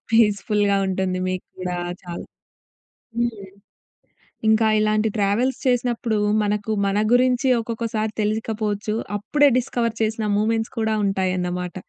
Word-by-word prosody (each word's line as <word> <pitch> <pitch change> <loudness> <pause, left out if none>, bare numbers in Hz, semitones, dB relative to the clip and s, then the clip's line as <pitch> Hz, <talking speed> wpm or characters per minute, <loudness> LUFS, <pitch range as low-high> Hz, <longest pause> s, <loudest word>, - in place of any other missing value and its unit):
పీస్‌ఫుల్‌గా 205 -2 +3
ఉంటుంది 185 -1 -1
మీకు 185 0 -3
కూడా 180 -1 -3 0.3
చాలా. 175 -1 -7 0.9
హ్మ్. 225 -5 -2 1.0
ఇంకా 220 0 +4
ఇలాంటి 215 +1 +2
ట్రావెల్స్ 210 +6 +1
చేసినప్పుడు 240 -2 +1 0.3
మనకు 210 +1 -1 0.2
మన 195 +1 +1
గురించి 255 +1 +3
ఒక్కొక్కసారి 225 -1 -3
తెలియకపోవచ్చు. 215 0 -1 0.2
అప్పుడే 285 +8 +3
డిస్కవర్ 235 -2 -1
చేసిన 220 0 -1
మూవ్మెంట్స్ 225 +2 0
కూడా 220 -1 +1
ఉంటాయన్నమాట. 180 -2 -1
215 Hz, 105 wpm, -22 LUFS, 200-230 Hz, 1.0 s, ఇంకా